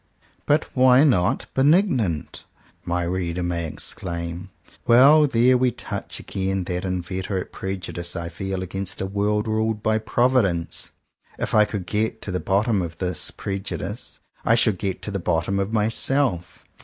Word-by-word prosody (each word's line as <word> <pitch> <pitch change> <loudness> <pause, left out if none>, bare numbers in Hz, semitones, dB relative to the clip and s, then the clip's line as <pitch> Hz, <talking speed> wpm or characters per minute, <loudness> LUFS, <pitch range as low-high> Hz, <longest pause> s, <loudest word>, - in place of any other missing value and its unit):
"But 150 +2 +3
why 130 +1 +6
not 115 - +2
benignant.?" 135 - +1 0.4
my 90 0 -1
reader 90 0 -2
may 85 -1 -2
exclaim. 85 +2 -5 0.4
Well! 140 +6 +7
there 125 0 +4
we 130 0 +3
touch 120 - -6
again 95 0 -2
that 90 +1 -3
inveterate 95 +1 -3
prejudice 90 -2 -5
I 85 -1 -3
feel 95 +2 -4
against 95 +1 -4
a - - -1
world 105 +2 0
ruled 110 0 -1
by 110 0 +2
Providence. 110 -7 +1 0.5
If - - -3
I 105 0 +6
could 100 -4 -5
get 110 +3 -1
to 100 - -4
the 90 - -1
bottom 100 +2 +1
of 85 -1 -5
this 90 0 -2
prejudice, 100 +2 -5 0.2
I 115 - +4
should 115 -1 +5
indeed 100 -2 0
get - - -21
to 105 - -3
the 100 - -2
bottom 90 +3 0
of 100 +2 -1
my 110 -2 +2
self. 115 -6 -1
100 Hz, 155 wpm, -23 LUFS, 90-115 Hz, 0.5 s, Well